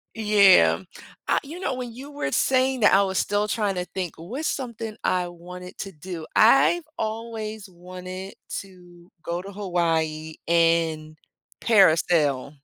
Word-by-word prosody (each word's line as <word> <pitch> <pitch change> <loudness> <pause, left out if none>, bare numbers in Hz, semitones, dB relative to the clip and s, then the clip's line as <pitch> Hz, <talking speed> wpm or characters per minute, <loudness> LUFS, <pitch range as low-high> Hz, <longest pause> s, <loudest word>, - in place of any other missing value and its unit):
Yeah, 195 - +5 0.5
uh, - - +2
you 320 +6 -9
know, 370 - -2
when 245 -2 -6
you 270 +4 -10
were 285 - -3
saying 260 0 +2
that, 205 - +5
I 200 +1 +6
was 190 -1 -2
still 205 +1 0
trying 210 -3 -1
to 180 0 -3
think, 180 -3 -5
"What's 250 - -5
something 230 -4 -4
I 180 -1 +1
wanted 180 +1 -11
to 195 - -5
do?" 165 0 -8
I've 275 +9 +5
always 220 -2 -5
wanted 185 +2 -9 0.3
to 180 -2 -17
go 170 +1 -3
to 200 +1 -9
Hawaii 165 -5 -1
and 165 -2 +1 0.4
parasail. 160 - +3
185 Hz, 140 wpm, -24 LUFS, 170-220 Hz, 0.5 s, I